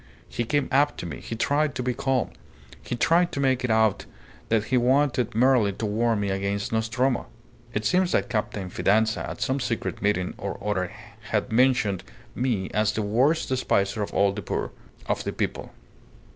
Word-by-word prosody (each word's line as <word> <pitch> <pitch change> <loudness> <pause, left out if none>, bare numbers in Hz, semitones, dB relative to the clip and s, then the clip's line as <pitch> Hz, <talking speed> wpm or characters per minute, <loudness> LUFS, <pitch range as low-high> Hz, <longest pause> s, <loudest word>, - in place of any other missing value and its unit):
He 120 - -2
came 145 +4 +1
up 145 +2 +3
to - - -5
me. 80 -4 -6
He 115 - -6
tried 145 +5 +1
to 125 - -2
be 125 0 0
calm. 130 -1 0 0.5
He - - -4
tried 170 +7 +3
to - - -3
make 130 -2 +2
it 125 - -1
out 110 -2 +2 0.4
that 110 -2 +2
he - - +6
wanted 125 -1 +2
merely 120 -4 +4
to 110 - -4
warn 110 +1 +1
me 100 -1 -1
against 100 +2 -2
Nostromo. 120 - 0 0.4
It 105 0 -2
seems 185 0 +2
that - - +2
Captain 105 -4 -3
Fidanza 110 +4 +1
at - - -7
some 130 +4 0
secret 120 -3 -3
meeting 100 -3 0
or - - -4
other 90 -3 -1 0.4
had - - 0
mentioned 110 -6 +2 0.3
me 120 -7 -1
as 105 -1 +2
the 110 - -1
worst 130 +10 +2
despiser 110 -5 0
of 100 - -3
all 100 0 +3
the 100 +1 -5
poor - - -3 0.3
of - - -1
the - - -2
people. - - -3
115 Hz, 185 wpm, -25 LUFS, 105-130 Hz, 0.5 s, he